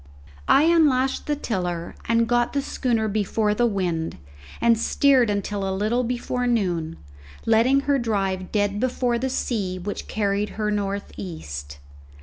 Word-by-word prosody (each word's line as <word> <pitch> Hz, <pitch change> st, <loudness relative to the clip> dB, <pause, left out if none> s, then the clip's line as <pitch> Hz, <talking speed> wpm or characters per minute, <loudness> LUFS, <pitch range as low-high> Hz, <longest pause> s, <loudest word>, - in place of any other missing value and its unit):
I 285 Hz, -, +6 dB
unlashed 295 Hz, -6 st, +3 dB
the 295 Hz, -, +1 dB
tiller 180 Hz, -, -3 dB
and 230 Hz, 0 st, +2 dB
got 240 Hz, 0 st, +1 dB
the 280 Hz, -, +1 dB
schooner 230 Hz, -6 st, 0 dB
before 210 Hz, +1 st, 0 dB
the 240 Hz, +3 st, +2 dB
wind 175 Hz, -, -2 dB, 0.4 s
and 235 Hz, 0 st, +4 dB
steered 260 Hz, -1 st, +3 dB
until 205 Hz, 0 st, -2 dB
a 190 Hz, 0 st, -1 dB
little 225 Hz, +5 st, +1 dB
before 245 Hz, +1 st, -2 dB
noon, 175 Hz, -9 st, 0 dB, 0.5 s
letting 235 Hz, +5 st, +4 dB
her 280 Hz, -1 st, +1 dB
drive 195 Hz, -5 st, -1 dB
dead 205 Hz, -1 st, 0 dB
before 245 Hz, -1 st, 0 dB
the 265 Hz, +2 st, -1 dB
sea, 205 Hz, -8 st, -2 dB
which 195 Hz, +3 st, -5 dB
carried 205 Hz, -1 st, 0 dB
her 210 Hz, -1 st, 0 dB
north 200 Hz, -1 st, -2 dB
east. 75 Hz, -, -7 dB
215 Hz, 145 wpm, -24 LUFS, 195-245 Hz, 0.5 s, I